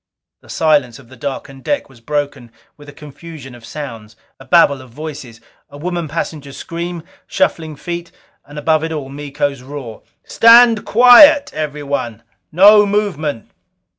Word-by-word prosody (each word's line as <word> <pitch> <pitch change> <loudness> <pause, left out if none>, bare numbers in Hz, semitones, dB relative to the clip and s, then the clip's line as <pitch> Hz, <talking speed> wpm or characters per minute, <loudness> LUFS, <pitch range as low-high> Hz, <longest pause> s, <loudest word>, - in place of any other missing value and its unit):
The - - -21
silence 145 -6 0
of 130 -4 -18
the 130 - -14
darkened 135 +1 -7
deck 290 - -2
was 130 -4 -20
broken 140 -2 -4 0.2
with 145 -1 -15
a - - -10
confusion 150 -2 -12
of 120 -1 -15
sounds. 115 -6 -9 0.2
A 135 - -14
babble 140 -3 +3
of 130 - -15
voices; 135 -4 -9 0.3
a 145 - -13
woman 170 +1 -4
passenger's 145 -2 -6
scream; 170 -1 -6 0.2
shuffling 160 -2 -2
feet; 170 +3 -7 0.3
and 145 +1 -14
above 155 +1 0
it 160 - -4
all, 145 -4 -5
Miko's 140 -1 -4
roar: 130 -4 -9 0.2
"Stand 230 -1 +5
quiet! 250 +6 +6
Everyone! 140 -6 -5 0.3
No 205 +5 +6
movement!" 170 - -3
145 Hz, 145 wpm, -16 LUFS, 135-170 Hz, 0.3 s, quiet